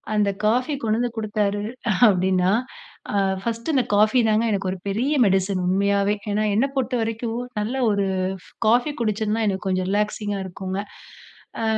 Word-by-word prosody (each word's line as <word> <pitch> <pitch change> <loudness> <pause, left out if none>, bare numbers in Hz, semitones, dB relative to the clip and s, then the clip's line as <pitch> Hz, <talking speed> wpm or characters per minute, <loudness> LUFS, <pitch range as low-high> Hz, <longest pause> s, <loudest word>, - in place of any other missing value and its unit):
அந்த 205 -1 +2 0.2
காஃபி 250 +7 +2
கொண்டு 220 0 +1
வந்து 245 0 0
குடுத்தாரு 205 -1 -1 0.5
அப்டின்னா, 185 -1 +2 0.6
ஆ - - -1 0.3
பர்ஸ்ட் 230 +6 -2
இந்த 260 -3 +3
காஃபி 215 +4 +4
தாங்க 215 +1 +2
எனக்கு 195 -2 -1
ஒரு 190 - -4
பெரிய 250 +9 0
மெடிசின் 190 -1 +1
உண்மயாவே. 200 +2 +2 0.2
ஏன்னா 210 +1 +1
என்ன 240 +6 +3
பொறுத்த 255 -1 0
வரைக்கும் 225 +1 -2 0.2
நல்ல 220 +5 -2 0.2
ஒரு 200 -1 +1 0.6
காஃபி 245 +6 +3
குடிச்சன்னா 215 0 0
எனக்கு 190 -1 -2
கொஞ்சம் 185 -1 0
ரிலாக்ஸிங்கா 210 -1 -1
இருக்கும்ங்க. 190 +1 -4 0.8
ஆ - - -1
210 Hz, 150 wpm, -23 LUFS, 195-230 Hz, 0.8 s, காஃபி